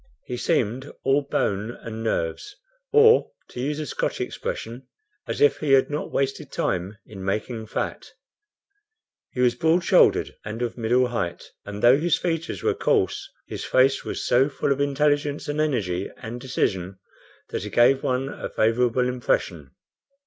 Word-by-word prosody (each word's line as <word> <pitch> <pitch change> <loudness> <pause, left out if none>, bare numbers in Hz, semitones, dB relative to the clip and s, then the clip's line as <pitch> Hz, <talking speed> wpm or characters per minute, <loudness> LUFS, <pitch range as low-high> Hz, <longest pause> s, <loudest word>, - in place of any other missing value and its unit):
He 125 - -4
seemed 125 +3 -1
all 135 +2 +3
bone 110 -5 -2
and 110 -1 -6
nerves, 110 - -2 0.4
or, 450 +1 +6 0.2
to - - -9
use 145 +4 -2
a 155 - -3
Scotch - - -2
expression, 120 +4 -5 0.4
as - - -3
if 440 - +5
he 145 -3 +1
had 135 +2 +4
not 150 - -3
wasted 135 0 -2
time 95 +4 -2
in 95 -3 -10
making 110 +3 -3
fat. - - -4 1.2
He 125 - -3
was 125 -1 +4
broad 160 +8 +2
shouldered - - +4
and 110 +3 -4
of 120 - -3
middle 125 +2 +2
height, 90 -8 -4
and 105 0 -7
though 125 +4 +7
his 170 +1 +2
features 165 -2 -3
were - - +2
coarse, - - 0 0.2
his - - -6
face 135 +1 +3
was - - -4
so 130 +4 +3
full 140 0 -1
of 140 +1 +1
intelligence 145 +1 +1
and 145 +1 -1
energy 100 -11 -1
and 120 +2 -7
decision, 95 -7 -2 0.5
that - - -3
he - - -5
gave 130 +3 +4
one 130 +1 -1
a - - -6
favorable 120 +2 +2
impression. 95 - -1
125 Hz, 160 wpm, -24 LUFS, 110-145 Hz, 1.2 s, though